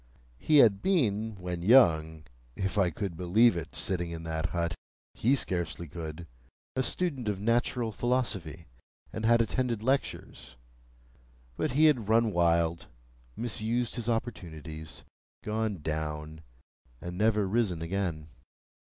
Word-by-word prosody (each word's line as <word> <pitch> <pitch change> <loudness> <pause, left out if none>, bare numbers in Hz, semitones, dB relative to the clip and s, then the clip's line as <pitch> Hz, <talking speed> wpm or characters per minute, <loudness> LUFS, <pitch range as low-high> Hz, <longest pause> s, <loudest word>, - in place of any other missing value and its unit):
He 150 - +3
had 105 -7 +6
been, 110 - +1
when 90 -2 -5
young 80 -8 +4 0.3
(if 95 +1 -2
I 95 -3 +3
could 95 +1 -4
believe 90 +6 +4
it, 85 -4 -6
sitting 85 -3 -1
in 85 -1 -6
that 80 +1 -2
hut,—he 85 - -2
scarcely 85 - -2
could), 80 +1 -7 0.5
a 130 - +1
student 135 -6 -1
of 100 -2 -2
natural 115 +1 0
philosophy, 105 - -2 0.5
and 110 0 -1
had 115 0 +5
attended 115 -1 -2
lectures; 135 - -2 1.0
but 120 - -1
he 155 +4 +5
had 125 -9 +3
run 115 0 +4
wild, 85 -1 +1 0.5
misused 120 +1 -1
his 120 -1 -3
opportunities, 80 -9 -5 0.4
gone 105 -5 -2
down, 75 0 -4 0.6
and 85 +1 -6
never 105 0 +2
risen 95 -6 0
again. 85 -4 -3
100 Hz, 125 wpm, -29 LUFS, 85-115 Hz, 1.0 s, had